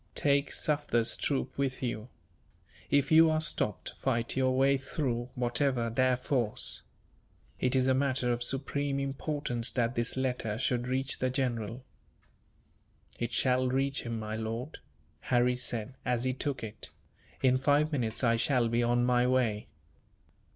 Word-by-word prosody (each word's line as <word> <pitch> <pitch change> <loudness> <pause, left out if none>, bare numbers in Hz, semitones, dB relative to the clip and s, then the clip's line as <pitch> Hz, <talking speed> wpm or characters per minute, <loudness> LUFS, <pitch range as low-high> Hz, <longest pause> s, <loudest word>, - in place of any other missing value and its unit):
Take 140 -1 +2
Sufder's 145 -6 +1
troop 135 -2 -2
with 135 -2 -1
you. 120 -1 -3 0.8
If 140 +1 +2
you 160 +1 +7
are 155 0 +2
stopped, 150 -9 -1
fight 115 -3 0
your 130 -1 +2
way 135 +1 +4
through, 130 -3 -3
whatever 125 -1 0
their 130 +1 +2
force. 125 -4 -1 0.8
It 125 0 +1
is 130 -1 +3
a 130 - +3
matter 130 -2 +1
of 120 - -4
supreme 140 +2 -1
importance 140 -3 -2
that 120 -1 0
this 120 +1 -1
letter 125 -5 -1
should 125 0 0
reach 130 +1 -1
the 130 - +1
general." 125 -2 -2 1.4
"It 120 0 -2
shall 130 +1 +2
reach 135 +2 0
him, 115 -1 -4
my 110 0 -4
lord," 115 +6 -5 0.4
Harry 125 0 +2
said, 125 -1 -4
as 125 -2 0
he 130 0 0
took 135 -1 -3
it; 110 -2 -6 0.5
"in 130 0 +4
five 145 +3 +2
minutes 120 -5 -1
I 115 -1 +3
shall 120 0 +2
be 120 +1 +1
on 120 +1 +2
my 125 0 +3
way." 120 -5 +1
125 Hz, 150 wpm, -30 LUFS, 120-135 Hz, 1.4 s, you